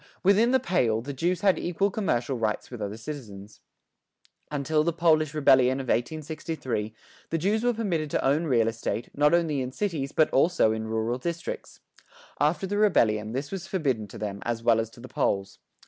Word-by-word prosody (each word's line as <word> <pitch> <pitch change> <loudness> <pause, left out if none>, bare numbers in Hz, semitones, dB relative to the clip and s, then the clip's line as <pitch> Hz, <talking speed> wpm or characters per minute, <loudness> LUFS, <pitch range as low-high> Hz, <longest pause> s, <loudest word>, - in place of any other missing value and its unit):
Within 200 +5 +5
the 260 +1 +4
"Pale," 115 - +1
the 140 +4 -6
Jews 170 +6 -1
had 195 -2 +3
equal 195 +3 0
commercial 135 - -1
rights 110 -1 -2
with 120 -3 -7
other 105 +1 -4
citizens. 110 -6 -9 0.9
Until 150 +1 0
the 170 - +1
Polish 155 -2 +2
rebellion 130 -3 +4
of 130 -2 -5
1863 150 -4 -2 0.4
the 165 - 0
Jews 205 +7 0
were 245 - +3
permitted 175 -9 -1
to - - -1
own 145 +5 +2
real 120 -6 +2
estate, 115 0 -3
not 150 +3 +4
only 160 -5 +1
in 130 0 -4
cities 150 -5 -2
but 155 - +2
also 150 -5 +3
in 110 0 -3
rural 110 +2 -1
districts. 170 +4 -5 0.6
After 155 +6 +1
the 205 +2 -2
rebellion 110 - +2
this 140 +3 -4
was 190 -1 -5
forbidden 135 - -1
to - - -11
them 100 -1 -4
as 115 -1 -3
well 115 -1 +4
as 110 -1 -2
to 115 - -17
the 125 - -9
Poles. 100 -5 -1
140 Hz, 185 wpm, -27 LUFS, 115-170 Hz, 0.9 s, Within